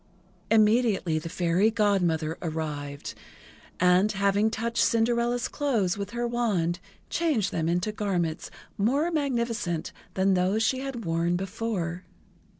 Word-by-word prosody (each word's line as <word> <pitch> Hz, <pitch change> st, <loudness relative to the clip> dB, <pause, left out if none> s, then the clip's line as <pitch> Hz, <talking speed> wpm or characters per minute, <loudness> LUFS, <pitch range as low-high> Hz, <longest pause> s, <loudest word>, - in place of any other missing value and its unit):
Immediately 215 Hz, -6 st, +3 dB
the 165 Hz, -, -7 dB
Fairy 180 Hz, +5 st, +2 dB
Godmother 180 Hz, -8 st, +1 dB
arrived, 150 Hz, -4 st, -4 dB, 0.7 s
and, 180 Hz, +3 st, +4 dB
having 200 Hz, +2 st, +2 dB
touched 230 Hz, +1 st, 0 dB
Cinderella's 235 Hz, +1 st, +1 dB
clothes 230 Hz, -11 st, 0 dB
with 200 Hz, -1 st, -5 dB
her 240 Hz, +1 st, -2 dB
wand, 200 Hz, -8 st, 0 dB, 0.3 s
changed 295 Hz, -, +1 dB
them 165 Hz, 0 st, -1 dB
into 180 Hz, +5 st, 0 dB
garments 180 Hz, -6 st, -2 dB, 0.3 s
more 280 Hz, +11 st, +2 dB
magnificent 235 Hz, -, -1 dB, 0.2 s
than 190 Hz, +1 st, +3 dB
those 190 Hz, +4 st, +2 dB
she 260 Hz, +3 st, +1 dB
had 265 Hz, -5 st, -5 dB
worn 165 Hz, +1 st, +1 dB
before. 190 Hz, -2 st, -3 dB
200 Hz, 120 wpm, -27 LUFS, 175-235 Hz, 0.7 s, and